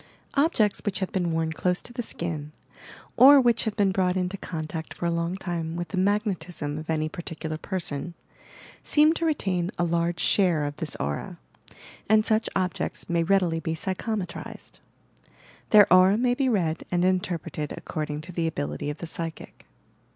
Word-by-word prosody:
Objects 275 - +2
which 205 -2 -1
have 190 - -3
been 175 -3 0
worn 160 0 -1
close 180 +2 0
to 240 - -9
the 240 - -3
skin, 160 -8 -5 0.6
or 280 +2 +9
which 240 -3 +3
have 220 -2 -2
been 200 -3 +2
brought 185 -1 +1
into 180 +1 -1
contact 160 -3 -6
for - - -4
a 170 - +1
long 170 +2 -1
time 170 -3 -4
with 175 0 -4
the 195 - -4
magnetism 180 -7 -1
of 155 - -9
any 155 -1 0
particular 160 -2 -5
person, 170 -3 -3 0.7
seem 305 +1 +4
to 330 0 -1
retain 185 - 0
a 175 - +1
large 170 0 0
share 175 -8 +3
of 145 0 -5
this 155 -4 -4
aura, 70 +1 -4 0.7
and 215 0 +5
such 220 0 +1
objects 180 -1 -2
may 170 -1 +2
readily 175 -2 +2
be 160 0 -3
psychometrized 190 +1 -5 0.5
— - - -27
their 210 -2 +8
aura 185 +2 +6
may 245 +1 +2
be 265 +1 +1
read 175 -8 0
and 175 0 +1
interpreted 180 -5 -1
according 150 -1 -4
to 170 +4 -9
the 170 -1 -1
ability 75 - -3
of 150 - -4
the 170 - -6
psychic. 165 0 -6
175 Hz, 175 wpm, -26 LUFS, 160-200 Hz, 0.7 s, or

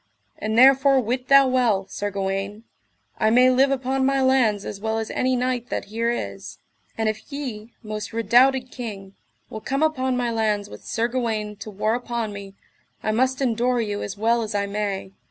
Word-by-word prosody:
And 220 +1 -2
therefore 270 +1 +6
wit 250 +2 -2
thou 275 -1 +7
well, 240 -7 +2
Sir 205 - -4
Gawaine, 195 +2 -3 0.6
I 215 - +3
may 250 +3 +5
live 265 +2 +4
upon 265 0 0
my 270 +1 +2
lands 255 -6 +2
as 200 -1 -6
well 220 0 -1
as 220 -1 -3
any 255 0 +1
knight 250 -1 -1
that - - -3
here 230 +1 0
is. 100 - -5 0.4
And 220 -1 0
if 215 +6 -4
ye, 240 -6 -6
most 215 -1 -5
redoubted 250 +3 +3
king, 200 -6 -7 0.4
will 220 - -6
come 275 +6 -1
upon 260 -5 0
my 240 -1 0
lands 210 -2 -1
with - - -11
Sir 230 +1 0
Gawaine 225 -4 -2
to 215 - -8
war 215 +2 -1
upon 235 -3 -3
me, 200 -1 -9 0.5
I 215 - 0
must 260 +4 +1
endure 245 0 +1
you 205 -3 -2
as 200 0 -5
well 230 +3 +2
as 215 -1 -4
I 200 0 +1
may. 200 -2 -3
230 Hz, 190 wpm, -23 LUFS, 210-255 Hz, 0.6 s, thou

